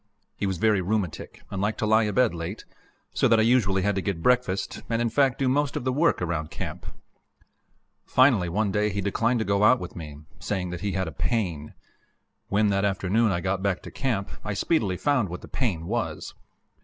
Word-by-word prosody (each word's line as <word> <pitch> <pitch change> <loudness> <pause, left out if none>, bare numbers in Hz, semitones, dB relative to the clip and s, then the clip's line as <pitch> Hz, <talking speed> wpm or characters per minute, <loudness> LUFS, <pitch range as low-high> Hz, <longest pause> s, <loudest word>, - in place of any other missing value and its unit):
He 100 - -2
was 95 -2 -2
very 105 +1 +2
rheumatic 95 -2 -3
and 95 - -3
liked 105 +2 0
to - - -1
lie 110 +1 +4
abed 115 +2 +2
late, 85 +5 -6 0.5
so - - +3
that 115 - +4
I 110 - +4
usually 105 -6 +3
had 105 +1 +2
to 95 - -1
get 90 -4 -3
breakfast, 125 -7 +1
and, 115 -1 0
in 120 0 +1
fact, 135 -3 +2
do 135 - 0
most 140 +1 +1
of - - -2
the 130 0 0
work 150 - +2
around 80 -3 -2
camp. - - -6 1.2
Finally 125 -9 +3
one 100 +3 0
day 105 +2 +1
he 100 0 -3
declined 115 +5 +1
to 110 - -1
go 100 +1 +1
out 120 +4 +6
with 90 - -8
me, 75 -4 -8 0.2
saying 90 -3 -3
that 90 -1 -6
he 100 -2 -2
had 95 -2 -1
a - - -5
pain. 85 - -2 0.7
When, 105 +1 +2
that 100 0 +1
afternoon, 100 +2 +1
I 85 -1 -1
got 95 0 -1
back 95 -2 -1
to - - -9
camp, 110 -7 -2
I 105 -1 -3
speedily 100 - +1
found 130 -7 +1
what 90 +1 -6
the - - -11
"pain" 95 -11 -2
was. 115 +4 -3
100 Hz, 210 wpm, -26 LUFS, 95-115 Hz, 1.2 s, out